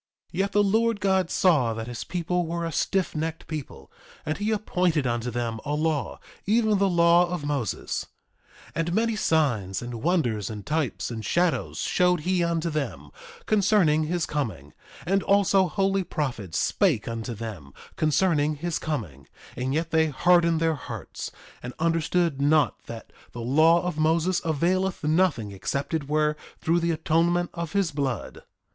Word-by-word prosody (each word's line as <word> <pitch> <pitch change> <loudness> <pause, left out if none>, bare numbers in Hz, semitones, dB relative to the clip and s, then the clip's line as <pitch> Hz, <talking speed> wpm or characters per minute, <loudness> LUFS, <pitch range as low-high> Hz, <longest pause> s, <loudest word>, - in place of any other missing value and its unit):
3:14 170 - -4
Yet 195 +1 +1
the 205 - +4
Lord 225 +2 +2
God 190 -3 +1
saw 145 -11 +3
that 110 0 -4
his 120 -1 -6
people 180 -1 -2
were 170 +1 -2
a 165 - -3
stiffnecked 165 -2 -1
people, 155 -4 -7 0.3
and 155 +3 -2
he 205 +1 -1
appointed 180 -8 0
unto 120 0 -1
them 115 -1 -3
a 145 +1 -2
law, 155 -3 -1 0.3
even 215 -1 +3
the 195 0 +3
law 170 0 +4
of 175 -4 -4
Moses. 140 - -2 0.6
3:15 - - -22
And 165 +2 -1
many 225 +2 +1
signs, 120 - +1
and 120 -2 -6
wonders, 125 - 0
and 105 -2 -7
types, 135 -11 -2
and 110 -2 -5
shadows 170 - 0
showed 180 -2 +2
he 180 +2 +1
unto 170 0 -1
them, 150 -2 -4 0.3
concerning 190 -7 +3
his 170 +1 -1
coming; 100 - -4 0.3
and 195 +3 +2
also 195 -1 +3
holy 195 +2 0
prophets 125 - -3
spake - - +1
unto 115 0 -4
them 100 -11 -7 0.2
concerning 155 -1 +2
his 170 +3 -3
coming; 90 - -5 0.3
and 130 +1 -2
yet 165 +3 -1
they 160 0 +3
hardened 170 +2 +3
their 165 0 +2
hearts, 140 - -7 0.3
and 125 0 -7
understood 165 -2 +1
not 150 +1 +2
that 115 -1 -9 0.2
the 120 - -6
law 155 +8 +4
of 180 -3 -3
Moses 165 +3 +2
availeth 180 +4 0
nothing 155 - +1
except 140 - -3
it 150 -3 -2
were 150 0 +2 0.2
through 170 +2 +2
the 170 0 0
atonement 165 +2 +1
of 170 -2 -5
his 195 -5 +1
blood. 135 -6 -3
160 Hz, 160 wpm, -26 LUFS, 135-180 Hz, 0.6 s, the